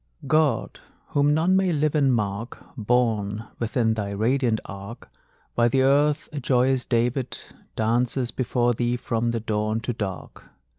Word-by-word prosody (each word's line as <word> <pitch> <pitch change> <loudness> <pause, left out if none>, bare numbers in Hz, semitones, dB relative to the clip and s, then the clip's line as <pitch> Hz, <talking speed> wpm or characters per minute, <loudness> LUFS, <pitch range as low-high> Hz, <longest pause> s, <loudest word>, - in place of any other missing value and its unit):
God, 145 -4 +1 0.3
whom 145 0 +2
none 165 +5 +3
may 190 -1 +2
live 150 -1 +1
and 140 -4 +3
mark, 105 0 -2 0.2
Borne 110 -3 0
within 115 0 +1
thy 105 -2 -3
radiant 115 +3 +1
ark! 100 +4 -9 0.4
While 120 0 +3
the 130 +2 +2
Earth, 145 +2 +3
a 145 - -3
joyous 130 0 +2
David, 120 +2 -1 0.4
Dances 120 +3 0
before 120 -1 0
thee 120 +1 -1
from 120 -1 -1
the 115 0 -1
dawn 110 0 -1
to 125 - -2
dark. 95 -5 -6
120 Hz, 145 wpm, -24 LUFS, 110-135 Hz, 0.4 s, none